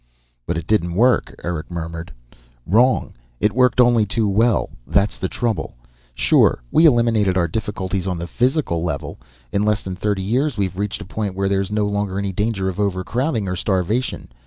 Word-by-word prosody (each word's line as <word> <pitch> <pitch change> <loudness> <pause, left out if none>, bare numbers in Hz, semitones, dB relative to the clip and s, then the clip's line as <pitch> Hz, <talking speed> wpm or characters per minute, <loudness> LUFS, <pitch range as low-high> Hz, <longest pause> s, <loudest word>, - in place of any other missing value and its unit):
"But - - -1
it 85 - -4
didn't 85 -4 +1
work," 120 +5 +2
Eric 85 -3 -4
murmured. 85 0 -6 0.5
"Wrong. 120 +8 +3 0.3
It 105 - +2
worked 125 0 +3
only 120 -2 +5
too 105 +2 0
well. 110 +3 +2 0.2
That's 100 +1 +1
the 95 - -2
trouble. 110 -9 -2 0.4
Sure, - - +3
we 165 - +6
eliminated 115 -8 +3
our 85 -2 +2
difficulties 95 -1 -3
on 90 -2 -1
the 85 - -4
physical 120 - 0
level. 80 -5 -4 0.3
In 100 - +1
less 105 0 +1
than 95 -1 -5
thirty 100 0 -1
years 125 +6 0
we've 95 -2 -2
reached 105 0 -3
a - - -13
point 100 0 -4
where 95 0 0
there's 95 -1 0
no 105 0 0
longer 100 -2 -2
any 100 -1 -2
danger 105 -1 -1
of 95 +1 -4
overcrowding 105 - -1
or 90 - -2
starvation. 95 - -1
100 Hz, 180 wpm, -21 LUFS, 95-115 Hz, 0.5 s, we